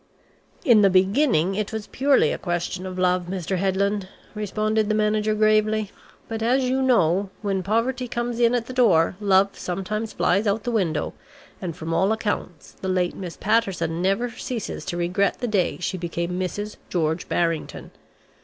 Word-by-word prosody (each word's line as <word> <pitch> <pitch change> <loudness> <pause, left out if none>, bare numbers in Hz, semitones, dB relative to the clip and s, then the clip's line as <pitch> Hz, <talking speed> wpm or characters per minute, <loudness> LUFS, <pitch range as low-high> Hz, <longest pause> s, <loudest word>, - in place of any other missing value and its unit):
"In 235 -5 +6
the 200 - +6
beginning 190 - +3
it 210 +1 -2
was 220 -2 -4
purely 275 +3 +2
a - - -3
question 180 +1 -3
of 185 0 -6
love, 180 -1 +1
Mr. 185 0 -2
Headland," 195 +1 0 0.3
responded 215 0 -1
the 215 - +2
manager 215 0 +1
gravely. 215 -1 +2 0.4
"But 225 -1 -4
as 250 +4 +2
you 260 +1 +1
know, 200 -7 +3
when 195 -2 0
poverty 240 +6 0
comes 240 0 -3
in 235 0 +4
at 235 -2 -1
the 255 - -7
door, 195 -10 +4
love 195 -1 +4
sometimes 205 +5 -3
flies 200 +4 +1
out 205 +2 +1
of - - -25
the 245 - -2
window, 170 -9 0 0.5
and 175 -4 -4
from 165 0 -4
all 190 +5 +2
accounts, 205 -7 -3
the 190 - -6
late 180 -1 0
Miss 180 -3 -7
Patterson 190 -6 0
never 195 +6 +1
ceases 230 -2 -5
to 175 -2 -3
regret 180 +3 +1
the 245 - -3
day 200 -5 +1
she 180 +1 -3
became 170 +1 -3
Mrs. 205 +3 -4
George 160 -1 -1
Barrington. 165 -2 -2
200 Hz, 175 wpm, -24 LUFS, 180-220 Hz, 0.5 s, In